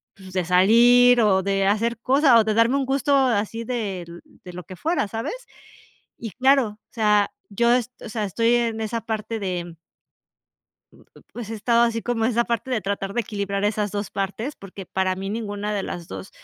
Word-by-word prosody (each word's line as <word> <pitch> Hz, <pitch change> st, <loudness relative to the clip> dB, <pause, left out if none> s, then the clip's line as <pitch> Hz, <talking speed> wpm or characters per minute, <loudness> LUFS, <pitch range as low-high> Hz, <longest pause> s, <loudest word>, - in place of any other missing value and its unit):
pues, 190 Hz, -1 st, -13 dB
de 185 Hz, -1 st, 0 dB
salir 235 Hz, +7 st, +5 dB
o 195 Hz, -3 st, +3 dB
de 195 Hz, 0 st, 0 dB
hacer 225 Hz, +3 st, +1 dB
cosas 265 Hz, 0 st, +4 dB
o -, -, +4 dB
de 215 Hz, 0 st, 0 dB
darme 230 Hz, +4 st, +3 dB
un 275 Hz, -, -1 dB
gusto 275 Hz, +2 st, +1 dB
así 230 Hz, -4 st, +1 dB
de 220 Hz, -6 st, -3 dB
l 170 Hz, 0 st, -11 dB, 0.2 s
de 180 Hz, -, -10 dB
lo 180 Hz, +1 st, -8 dB
que 185 Hz, -, -10 dB
fuera", 320 Hz, -, -1 dB
¿sabes? 225 Hz, -, -4 dB, 0.8 s
Y 225 Hz, -2 st, -7 dB
claro, 265 Hz, +1 st, +3 dB
o 210 Hz, +1 st, -15 dB
sea, 210 Hz, -2 st, +2 dB, 0.2 s
yo 235 Hz, +4 st, +2 dB
es 250 Hz, 0 st, 0 dB
o -, -, -7 dB
sea, 215 Hz, -1 st, -2 dB
estoy 230 Hz, +5 st, +1 dB
en 230 Hz, -2 st, -1 dB
esa 225 Hz, +1 st, -3 dB
parte 220 Hz, 0 st, -4 dB
de. 175 Hz, -4 st, -4 dB, 1.2 s
Mm, -, -, -20 dB, 0.3 s
pues 230 Hz, -3 st, -7 dB
he -, -, -4 dB
estado 235 Hz, +2 st, +2 dB
así 230 Hz, -1 st, 0 dB
como 235 Hz, -2 st, -1 dB
esa 235 Hz, 0 st, +2 dB
parte 235 Hz, +2 st, -3 dB
de 245 Hz, -4 st, 0 dB
tratar 195 Hz, 0 st, -4 dB
de 240 Hz, -, +1 dB
equilibrar 200 Hz, -2 st, -3 dB
esas 210 Hz, 0 st, 0 dB
2 205 Hz, +1 st, -4 dB
partes, 210 Hz, +8 st, -4 dB
porque 195 Hz, -1 st, -10 dB
para 190 Hz, 0 st, -1 dB
mí 195 Hz, +1 st, -5 dB
ninguna 210 Hz, -1 st, -4 dB
de 200 Hz, -, -1 dB
las 175 Hz, -3 st, -6 dB
2, 95 Hz, 0 st, -8 dB
220 Hz, 200 wpm, -23 LUFS, 195-235 Hz, 1.2 s, salir